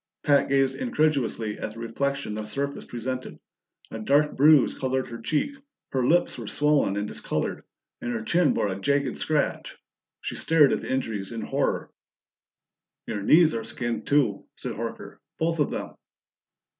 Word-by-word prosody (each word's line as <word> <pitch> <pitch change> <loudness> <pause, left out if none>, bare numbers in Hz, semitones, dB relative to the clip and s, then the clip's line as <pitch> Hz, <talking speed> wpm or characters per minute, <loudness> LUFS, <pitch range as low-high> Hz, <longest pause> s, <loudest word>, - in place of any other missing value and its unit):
Pat 140 -3 +3
gazed 135 -1 +3
incredulously 145 - 0
at 110 - -4
the - - -9
reflection 140 +1 -2
the 110 0 -4
surface 140 +6 -4
presented; 130 +2 -5 0.5
a 110 - -5
dark 145 +7 +2
bruise 150 0 +6
colored 130 0 -1
her 115 0 -7
cheek, 160 - -1 0.4
her 130 -2 0
lips 175 -4 +2
were 115 - -6
swollen 145 -7 +2
and 105 +1 -1
discolored, - - -3 0.4
and 120 - -3
her 110 -2 -3
chin 170 +7 +3
bore 105 - 0
a 95 0 -4
jagged 140 +3 0
scratch. 150 -2 -1 0.4
She - - -4
stared 155 -4 +4
at - - -1
the - - -5
injuries 110 -7 -2
in 115 -1 -4
horror. - - -1 1.1
"Your 105 -2 -3
knees 155 - +5
are 115 - -2
skinned, 115 -1 -3
too," 135 -9 +2
said - - -5
Horker. - - -6 0.2
"Both 165 0 0
of 145 - +2
them." - - -5
130 Hz, 160 wpm, -26 LUFS, 115-150 Hz, 1.1 s, bruise